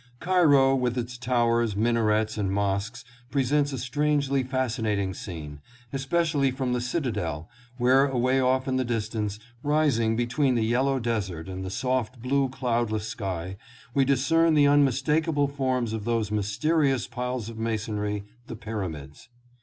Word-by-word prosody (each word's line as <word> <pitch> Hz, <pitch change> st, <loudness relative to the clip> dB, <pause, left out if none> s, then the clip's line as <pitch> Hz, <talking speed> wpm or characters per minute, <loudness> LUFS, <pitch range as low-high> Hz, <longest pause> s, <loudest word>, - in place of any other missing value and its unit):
Cairo 150 Hz, -7 st, +4 dB
with 125 Hz, -2 st, 0 dB
its 120 Hz, 0 st, -3 dB
towers, 120 Hz, -3 st, +1 dB
minarets 110 Hz, -1 st, +1 dB
and 100 Hz, -3 st, -1 dB
mosques 100 Hz, +4 st, -2 dB, 0.2 s
presents 140 Hz, +2 st, +1 dB
a 135 Hz, -, -3 dB
strangely 140 Hz, +2 st, 0 dB
fascinating 115 Hz, -7 st, -1 dB
scene, 80 Hz, -6 st, -8 dB, 0.3 s
especially 140 Hz, +1 st, +1 dB
from 130 Hz, -1 st, -2 dB
the 125 Hz, -, 0 dB
cita 125 Hz, +1 st, -1 dB
del, 80 Hz, -6 st, -4 dB, 0.3 s
where 130 Hz, +3 st, +4 dB
away 130 Hz, 0 st, +1 dB
off 130 Hz, 0 st, +1 dB
in 130 Hz, -1 st, 0 dB
the 130 Hz, -, +1 dB
distance, 110 Hz, -3 st, -2 dB, 0.2 s
rising 140 Hz, -7 st, +2 dB
between 125 Hz, +3 st, +1 dB
the 115 Hz, -2 st, +1 dB
yellow 130 Hz, +4 st, +1 dB
desert 100 Hz, -9 st, -3 dB
and 95 Hz, 0 st, -5 dB
the 95 Hz, -, -4 dB
soft 125 Hz, +3 st, -2 dB
blue 135 Hz, +2 st, +1 dB
cloudless 120 Hz, -5 st, -1 dB
sky, 95 Hz, -3 st, -4 dB, 0.4 s
we 135 Hz, -, +3 dB
dis 135 Hz, 0 st, +1 dB
cern 165 Hz, 0 st, +4 dB
the 145 Hz, -1 st, +5 dB
unmistakable 145 Hz, +2 st, +2 dB
forms 130 Hz, -5 st, -1 dB
of 110 Hz, -2 st, -3 dB
those 115 Hz, -2 st, -1 dB
mysterious 135 Hz, +7 st, +1 dB
piles 125 Hz, -2 st, -4 dB
of 115 Hz, -1 st, -8 dB
masonry, 105 Hz, -2 st, -2 dB, 0.2 s
the -, -, -6 dB
Pyramids. 90 Hz, -10 st, -6 dB
125 Hz, 145 wpm, -26 LUFS, 110-135 Hz, 0.4 s, the